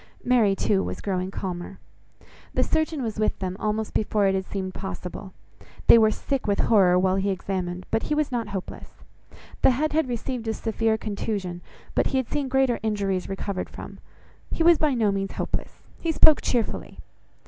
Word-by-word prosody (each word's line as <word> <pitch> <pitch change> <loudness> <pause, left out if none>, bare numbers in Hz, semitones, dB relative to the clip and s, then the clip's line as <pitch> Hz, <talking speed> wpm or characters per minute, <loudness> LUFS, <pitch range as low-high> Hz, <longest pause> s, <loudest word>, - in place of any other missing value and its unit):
Mary, 230 -6 +3
too, 195 0 +1
was - - -4
growing 185 -2 -2
calmer. 185 -1 -5 0.8
The - - +3
surgeon 315 -3 0
was 220 -2 -3
with 215 - +1
them 185 -1 -3
almost 215 0 -2
before 210 -1 +1
it 195 - +3
had 190 -1 -2
seemed 190 -2 -4
possible. 190 0 -6 0.5
They 230 - +8
were 220 -1 +5
sick 270 +4 -2
with 200 -1 +1
horror, 185 -5 +5
while 185 +1 +2
he 195 +1 0
examined; 185 -1 -3
but 225 - +2
he 300 - -1
was 300 -2 0
not 235 -3 -1
hopeless. 195 -2 -7 0.6
The - - +6
head 295 +5 0
had 315 -4 +1
received 240 0 -3
a 220 - 0
severe 225 0 0
contusion, 200 -4 -3 0.3
but - - +2
he 270 - 0
had 260 -3 -1
seen 290 -2 -1
greater 265 -2 +2
injuries 200 -4 -1
recovered 195 -1 -3
from: - - -10 0.5
he 330 - 0
was 340 -1 +6
by 300 -4 +2
no 220 -4 +2
means 195 0 -2
hopeless; - - -4 0.2
he 330 - 0
spoke 310 -1 +6
cheerfully. 235 -3 -2
210 Hz, 180 wpm, -25 LUFS, 190-250 Hz, 0.8 s, They